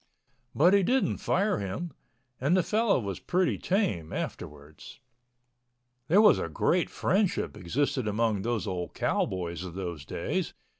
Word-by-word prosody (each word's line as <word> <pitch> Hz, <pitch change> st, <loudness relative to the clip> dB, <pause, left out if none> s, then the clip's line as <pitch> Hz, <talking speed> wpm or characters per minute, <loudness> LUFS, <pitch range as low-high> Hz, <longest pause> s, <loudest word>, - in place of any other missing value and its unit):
But 175 Hz, +6 st, +5 dB
he 200 Hz, -, +5 dB
didn't 255 Hz, +8 st, +1 dB
fire 200 Hz, -, +1 dB
him, 100 Hz, -, -4 dB, 0.5 s
and 150 Hz, +8 st, +2 dB
the 185 Hz, -, +3 dB
fellow 220 Hz, -, +2 dB
was 100 Hz, -5 st, -4 dB
pretty 180 Hz, 0 st, 0 dB
tame 180 Hz, -, -1 dB
afterwards. 75 Hz, 0 st, -7 dB, 1.1 s
There 190 Hz, +8 st, +5 dB
was 210 Hz, -, +6 dB
a -, -, -3 dB
great 175 Hz, 0 st, +1 dB
friendship 195 Hz, 0 st, 0 dB
existed 130 Hz, +6 st, -1 dB
among 105 Hz, -1 st, 0 dB
those 115 Hz, +1 st, -1 dB
old 90 Hz, -3 st, -4 dB
cowboys 85 Hz, -2 st, -1 dB
of 90 Hz, -2 st, -8 dB
those 85 Hz, -6 st, -5 dB
days. -, -, -3 dB
115 Hz, 140 wpm, -28 LUFS, -, 1.1 s, was